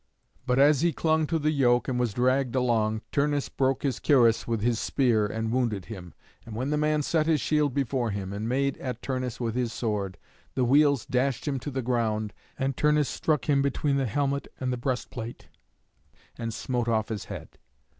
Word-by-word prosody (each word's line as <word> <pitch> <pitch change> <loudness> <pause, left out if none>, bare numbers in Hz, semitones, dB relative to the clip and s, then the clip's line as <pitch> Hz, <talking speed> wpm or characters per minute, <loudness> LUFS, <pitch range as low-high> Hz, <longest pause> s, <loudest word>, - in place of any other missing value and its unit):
But 125 0 +2
as 145 +1 +5
he 170 -1 +2
clung 160 +1 +1
to 165 - 0
the 155 0 +1
yoke 125 -4 +3
and 125 -2 -1
was 120 -4 0
dragged 130 +1 +1
along, 110 -4 +1
Turnus 145 0 0
broke 135 0 0
his 135 -5 -1
cuirass 120 -6 +4
with 115 -2 0
his 115 0 +1
spear, 115 -6 +2
and 110 +1 -3
wounded 115 -6 0
him. 90 -7 -9 0.3
And 115 -2 -9
when 130 +5 -2
the - - +2
man 150 0 +1
set 155 +1 +1
his 160 -2 +3
shield 150 -1 +1
before 130 -3 0
him, 100 -1 -4
and 105 +3 -3
made 140 +2 0
at 125 -3 -5
Turnus 130 -2 -3
with 115 -3 -1
his 120 -1 -1
sword, 105 -6 -2 0.4
the 130 - +2
wheels 140 0 +4
dashed 130 +2 0
him 135 -2 0
to 145 - -5
the 130 -2 -3
ground, 110 -3 0 0.2
and 135 -1 -1
Turnus 150 0 +2
struck 150 -5 0
him 140 -2 +3
between 140 +1 0
the 135 -2 0
helmet 140 +4 -1
and 130 -1 -1
the - - 0
breast 125 0 -2
plate, 115 -1 -7 0.9
and 115 -1 -4
smote 120 +1 -2
off 110 -2 +1
his 110 -3 -4
head. - - -9
125 Hz, 200 wpm, -27 LUFS, 115-140 Hz, 0.9 s, as